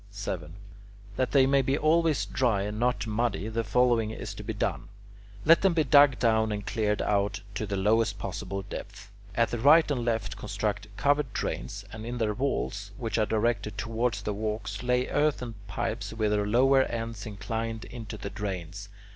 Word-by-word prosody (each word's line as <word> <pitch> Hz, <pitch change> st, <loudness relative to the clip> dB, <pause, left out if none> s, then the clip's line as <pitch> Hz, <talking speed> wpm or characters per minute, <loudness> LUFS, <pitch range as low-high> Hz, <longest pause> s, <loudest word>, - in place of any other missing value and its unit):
7. 95 Hz, -5 st, -5 dB, 0.6 s
That 130 Hz, -1 st, 0 dB
they 135 Hz, -2 st, +5 dB
may 135 Hz, +1 st, +4 dB
be 135 Hz, +2 st, 0 dB
always 160 Hz, -1 st, +2 dB
dry 115 Hz, -7 st, +1 dB
and 105 Hz, +1 st, -4 dB
not 125 Hz, 0 st, +1 dB
muddy, 110 Hz, -1 st, -1 dB
the 115 Hz, +1 st, -1 dB
following 115 Hz, +1 st, +2 dB
is 110 Hz, -, -6 dB
to -, -, -8 dB
be -, -, -3 dB
done. -, -, -2 dB, 0.6 s
Let 165 Hz, +2 st, +7 dB
them 190 Hz, -3 st, +3 dB
be 160 Hz, -, +3 dB
dug 140 Hz, -1 st, +6 dB
down 110 Hz, -2 st, +2 dB
and 105 Hz, -1 st, -3 dB
cleared 105 Hz, -2 st, 0 dB
out 100 Hz, 0 st, 0 dB
to 110 Hz, -, -3 dB
the 100 Hz, -1 st, -2 dB
lowest 110 Hz, +4 st, +2 dB
possible 100 Hz, 0 st, -4 dB
depth. 100 Hz, -, -9 dB, 0.2 s
At 115 Hz, -1 st, +2 dB
the 120 Hz, -, -2 dB
right 150 Hz, +5 st, +6 dB
and 125 Hz, -4 st, 0 dB
left 110 Hz, -4 st, -1 dB
construct 105 Hz, 0 st, -3 dB
covered 145 Hz, -1 st, +2 dB
drains, -, -, -4 dB
and 110 Hz, 0 st, -8 dB
in 120 Hz, +2 st, -4 dB
their 110 Hz, -2 st, 0 dB
walls, 105 Hz, -5 st, -2 dB
which 115 Hz, -1 st, -2 dB
are 110 Hz, -, +2 dB
directed 110 Hz, -2 st, 0 dB
towards 115 Hz, -2 st, -1 dB
the 105 Hz, -, -2 dB
walks, 105 Hz, -1 st, -3 dB
lay 125 Hz, 0 st, +1 dB
earthen 145 Hz, -5 st, 0 dB
pipes 115 Hz, +4 st, -3 dB
with 110 Hz, -2 st, 0 dB
their 105 Hz, -1 st, +1 dB
lower 135 Hz, +5 st, +5 dB
ends 115 Hz, -3 st, -3 dB
inclined 110 Hz, +2 st, -4 dB
into 110 Hz, -3 st, -8 dB
the 100 Hz, -, -6 dB
drains. 95 Hz, -1 st, -5 dB
110 Hz, 180 wpm, -28 LUFS, 105-125 Hz, 0.6 s, Let